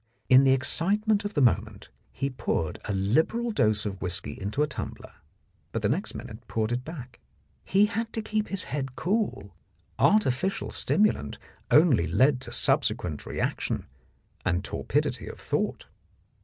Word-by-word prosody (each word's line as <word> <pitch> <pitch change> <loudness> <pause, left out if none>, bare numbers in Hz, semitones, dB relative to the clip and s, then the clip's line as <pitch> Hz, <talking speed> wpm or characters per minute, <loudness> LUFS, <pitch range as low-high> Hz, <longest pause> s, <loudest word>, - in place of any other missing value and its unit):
In 130 +1 +7
the 135 - +5
excitement 200 - +1
of 205 - -4
the 145 - +3
moment 105 -2 +1 0.2
he 140 0 -2
poured 110 -10 -2
a - - -2
liberal 160 - +1
dose 110 - +2
of 100 -2 -4
whisky 90 0 -2
into 105 +9 -2
a - - +1
tumbler, 140 - -7 0.6
but 115 - -3
next 185 - -2
minute 110 +1 -9
poured 110 0 -1
it 125 +1 -1
back. 130 -5 -9 0.4
He 200 +2 +4
had 225 +2 -3
to 225 - -2
keep 215 0 -1
his 195 -2 0
head 135 -3 -4
cool; 185 - -1 0.4
artificial 190 - +2
stimulant 200 - +1 0.3
only 145 - +5
led 130 - +3
to - - -6
subsequent 75 -2 0
reaction - - -2 0.6
and 90 0 0
tor - - -5
pidity - - 0
of - - -8
thought. - - -2
130 Hz, 150 wpm, -27 LUFS, -, 0.6 s, In